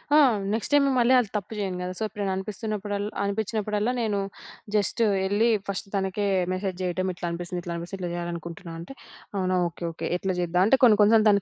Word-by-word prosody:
ఆ! - - +8 0.4
Next 225 - -2
time 285 -1 +6
మళ్ళీ 245 +1 +4
అది 225 -5 -1
తప్పు 205 +2 -6
జేయను 190 -3 -2
గదా! 180 0 -3
సో, 220 - -1
ఎప్పుడైనా 205 -2 -3
అనిపిస్తున్నప్పుడల్లా, 205 0 -3
అనిపించినప్పుడల్లా 210 +2 -1
నేను 210 -3 0 0.6
జస్ట్ 210 +3 +1 0.2
ఎళ్లి 205 +4 +3 0.2
ఫస్ట్ 200 0 -3
తనకే 195 +1 -1 0.3
మెసేజ్ 185 -1 -3
జేయటం 185 +1 -1
ఇట్లా 175 - -6
అనిపిస్తుంది, 175 +1 -4
ఇట్లా 170 -1 -4
అనిపిస్తుంది, 170 +3 -6
ఇట్లా 175 - -2
జేయాలనుకుంటున్నా 170 -1 -5
అంటే, 175 +11 -8 0.4
"అవునా! 185 -1 +1
ఓకే. 170 +1 -9
ఓకే. 165 - -6
ఎట్లా 190 +1 -1
జేద్దాం?" 180 0 +1
అంటే 270 - +5
కొన్ని 225 -4 +7
కొన్ని 210 +2 +6
సార్లు 220 0 +5
తను 200 -1 +4
195 Hz, 190 wpm, -26 LUFS, 180-215 Hz, 0.6 s, ఆ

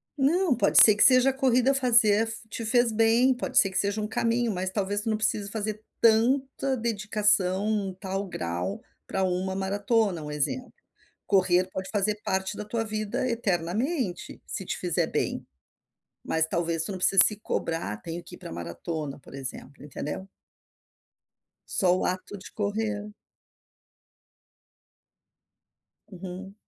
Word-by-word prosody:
Não, 305 +2 +2
pode 240 - +4
ser 215 - +7
que 205 - +5
seja 255 0 +6
a - - -1
corrida 260 0 +2
fazer 230 -5 +4 0.2
te 225 +2 -5
fez 240 +1 +3
bem, 230 +4 +3
pode 245 - -3
ser 195 - +6
que 190 - -3
seja 205 +1 0
um 210 - -2
caminho 230 +1 0
mas 185 -1 -2
talvez 200 0 -1
tu 225 - -3
não 215 - +1
precise 210 -2 0
fazer 215 0 -4 0.2
tanta 260 +4 +2
dedicação, 210 -3 +1
tal 195 0 -4
grau, 90 - -4 0.3
para 190 - -1
uma 185 +1 -1
maratona, 200 -1 0
um 150 - -6
exemplo. 150 - -2 0.6
Correr 185 -2 +3
pode 190 0 -5
fazer 210 0 0
parte 190 +2 -2
da 210 - -5
tua 225 +2 -2
vida 215 +2 -3
eternamente, 215 - -2
se - - -6
te - - -3
fizer - - 0
bem. - - -2 0.8
Mas 160 -1 +1
talvez 165 -1 -1
tu 185 - -5
não 190 - -4
precise 190 +1 +6
se 210 - 0
cobrar, 165 - -3
tenho 165 +5 -6
que - - -11
ir - - -16
para - - -10
maratona 135 - -5
por - - -16
exemplo, 135 +1 -8
entendeu? 150 +5 -6 1.4
Só 180 -2 +2
o - - -2
ato 185 +2 -3
de 185 - -11
correr. 210 0 -3 3.0
Uhum. 190 +1 -8
205 Hz, 145 wpm, -26 LUFS, 185-225 Hz, 3.0 s, ser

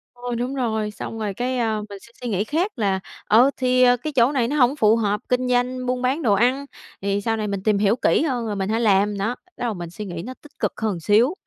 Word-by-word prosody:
Thôi 245 0 -4
đúng 250 +3 -2
rồi, 220 -5 -1
xong 225 +2 -7
rồi 210 -2 -2
cái, 250 +5 -2
ờ, 220 -2 0
mình 200 -1 -8
sẽ 235 - -17
suy 245 - -3
nghĩ 200 -2 0
khác 330 - -1
là, 200 -5 0 0.3
ờ, 240 +6 +5
thì, 255 0 +3
ờ, 245 0 +5
cái 300 +5 -5
chỗ 250 0 +4
này 255 -5 +1
nó 285 - -2
hổng 260 -1 +4
phù 220 -6 +4
hợp 210 -2 0
kinh 250 0 +1
doanh, 250 +1 0
buôn 250 0 -1
bán 260 +5 0
đồ 225 -8 +3
ăn 250 +7 +2 0.4
thì 200 +1 0
sau 225 +1 -1
này 215 - -2
mình 200 -2 -3
tìm 210 -1 +2
hiểu 205 +2 +3
kỹ 255 - +2
hơn 255 -7 -1
rồi 210 -2 -3
mình 195 0 -2
hãy 225 +2 0
làm 205 -1 +3
nó, 220 +5 -1
bắt 365 - -32
đầu 240 -2 -2
mình 175 -3 -6
suy 210 +5 -7
nghĩ 175 -3 -5
nó 255 - -6
tích 295 0 -18
cực - - 0
hơn 210 -6 -1
xíu. 215 - +3
230 Hz, 270 wpm, -22 LUFS, 205-255 Hz, 0.4 s, ờ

